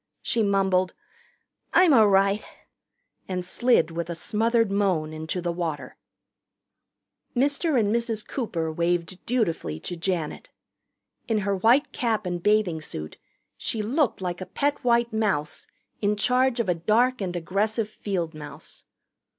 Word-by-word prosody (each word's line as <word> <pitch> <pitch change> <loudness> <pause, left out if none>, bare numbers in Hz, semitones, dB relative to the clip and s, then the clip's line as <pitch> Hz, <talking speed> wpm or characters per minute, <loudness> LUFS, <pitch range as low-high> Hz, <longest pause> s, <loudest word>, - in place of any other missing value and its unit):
She 230 - +1
mumbled, 190 -3 +2 0.8
"I'm 360 -5 +6
a' 220 -4 +7
right," 195 +1 +3 0.8
and 180 -1 -3
slid 210 -4 +2
with 170 +1 -4
a 170 - -3
smothered 225 +4 +1
moan 185 -6 +1
into 160 +3 -4
the 175 0 -1
water. 170 -3 -4 1.4
Mr. 280 +2 +2
and 210 -1 +1
Mrs. 230 -2 -1
Cooper 170 - -2
waved 170 +2 -1
dutifully 170 - -1
to 175 - -5
Janet. 170 -3 -3 0.8
In 225 - +1
her 200 -1 +1
white 230 +9 +3
cap 225 -4 -1
and 175 -1 -3
bathing 210 -5 +2
suit 75 - -6 0.4
she 220 -2 -2
looked 260 0 0
like 180 0 -3
a 185 - -5
pet 285 0 -1
white 235 -1 +2
mouse 195 -9 -1 0.3
in 210 0 +2
charge 250 +3 +2
of 230 - 0
a 180 - +3
dark 220 +9 +2
and 180 -2 -3
aggressive 205 +6 0
field 185 -6 -3
mouse. 150 0 -10
200 Hz, 140 wpm, -25 LUFS, 170-230 Hz, 1.4 s, a